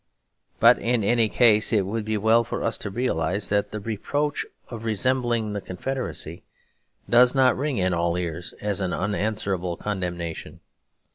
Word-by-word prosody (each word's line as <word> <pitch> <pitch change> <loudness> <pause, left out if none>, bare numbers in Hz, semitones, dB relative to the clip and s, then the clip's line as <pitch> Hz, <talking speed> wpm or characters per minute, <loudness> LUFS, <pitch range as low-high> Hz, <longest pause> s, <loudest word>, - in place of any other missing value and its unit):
But - - +6
in 120 -2 0
any 115 +1 +3
case, 110 -3 +4
it 105 -4 +2
would 105 +2 -3
be 110 0 -1
well 110 +3 +4
for 115 - -4
us 115 - -1
to 100 - -4
realise 95 -4 -1
that 100 0 +1
the 105 - -5
reproach 145 +8 -2 0.2
of 115 -2 -8
resembling 115 -1 0
the 100 - -3
Confederacy 130 +9 -5 0.6
does 125 +2 +5
not 130 -2 +4
ring 140 -2 -2
in 95 -1 +1
all 85 0 0
ears 85 -1 -4
as 105 -1 -2
an 95 -2 -1
unanswerable 100 -3 -2
condemnation. 90 -5 -5
105 Hz, 155 wpm, -24 LUFS, 95-120 Hz, 0.6 s, But